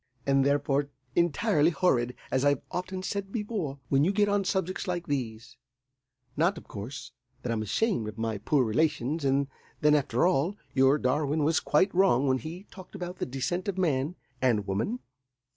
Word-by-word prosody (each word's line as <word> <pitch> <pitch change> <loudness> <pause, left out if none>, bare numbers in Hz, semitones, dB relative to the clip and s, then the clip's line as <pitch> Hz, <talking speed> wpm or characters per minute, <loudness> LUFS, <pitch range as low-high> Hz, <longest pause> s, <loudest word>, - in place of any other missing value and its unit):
"And, 135 -1 +3
therefore, 140 0 +1 0.3
entirely 160 -2 +3
horrid, 125 -9 +1 0.2
as 130 0 +1
I've 145 -2 +2
often 185 +1 -4
said 195 0 -3
before, 205 - -3
when 135 0 +4
you 180 - +3
get 205 0 +2
on 205 0 +2
subjects 190 +1 -1
like 175 -1 -2
these. 120 -5 -4 0.8
Not, 170 +6 +2
of - - -11
course, 130 +6 -7 0.3
that 120 - -2
I'm 115 -2 -1
ashamed 115 - 0
of 105 0 -7
my 110 -2 -2
poor 130 +5 +2
relations; 145 +4 0
and 140 0 +2 0.3
then, 150 0 +5
after 135 -2 +2
all, 180 +3 +1 0.2
your 135 +2 +5
Darwin 145 +3 +1
was 160 +2 +3
quite 185 +7 +2
wrong 175 -8 +4
when 130 0 +2
he 165 +6 -7
talked 185 -2 -12
about 180 +1 -5
the - - -3
descent 140 +9 -2
of 195 -2 -2
man 155 -2 0 0.3
and 115 -6 +2
woman. 110 - -2
145 Hz, 175 wpm, -28 LUFS, 130-180 Hz, 0.8 s, then